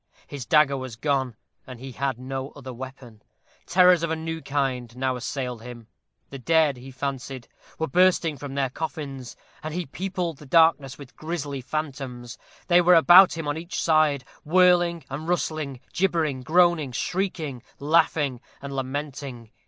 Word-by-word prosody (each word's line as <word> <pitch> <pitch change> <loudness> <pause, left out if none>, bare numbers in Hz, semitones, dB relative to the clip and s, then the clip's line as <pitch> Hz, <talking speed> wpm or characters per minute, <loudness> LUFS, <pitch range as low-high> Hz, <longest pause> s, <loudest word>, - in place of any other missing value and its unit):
His 135 -5 -8
dagger 150 -3 +4
was 130 -3 -6
gone, 135 -2 -1 0.3
and 130 -2 -9
he 135 +1 -8
had 135 0 -2
no 135 +1 -5
other 130 -3 -8
weapon. 125 -3 -10 0.5
Terrors 180 -2 +5
of 170 - -1
a 160 - 0
new 160 0 -5
kind 130 -5 -2
now 130 0 0
assailed 125 -1 -4
him. 120 -1 -10 0.5
The 135 - -7
dead, 155 +1 +3
he 125 +2 -11
fancied, 130 -1 -5 0.3
were 160 - -1
bursting 180 -2 +3
from 140 +1 -7
their 135 -2 0
coffins, 140 -5 -6 0.3
and 155 +1 -5
he 180 -1 -2
peopled 180 0 -4
the 150 - -13
darkness 160 -3 +3
with 140 -3 -13
grisly 150 -4 -4
phantoms. 130 -4 -5 0.3
They 175 0 +5
were 180 +1 +5
around 165 - +8
about 180 +1 +8
him 165 -2 -4
on 145 +1 -1
each 170 +2 -5
side, 155 -4 +2 0.2
whirling 175 0 +3
and 145 +4 -6
rustling, 155 -6 -2
gibbering, 165 -8 0
groaning, 165 -2 +3
shrieking, 160 -6 -3 0.2
laughing, 145 -4 +1 0.2
and 140 0 -7
lamenting. 135 -3 -5
140 Hz, 160 wpm, -25 LUFS, 130-165 Hz, 0.5 s, around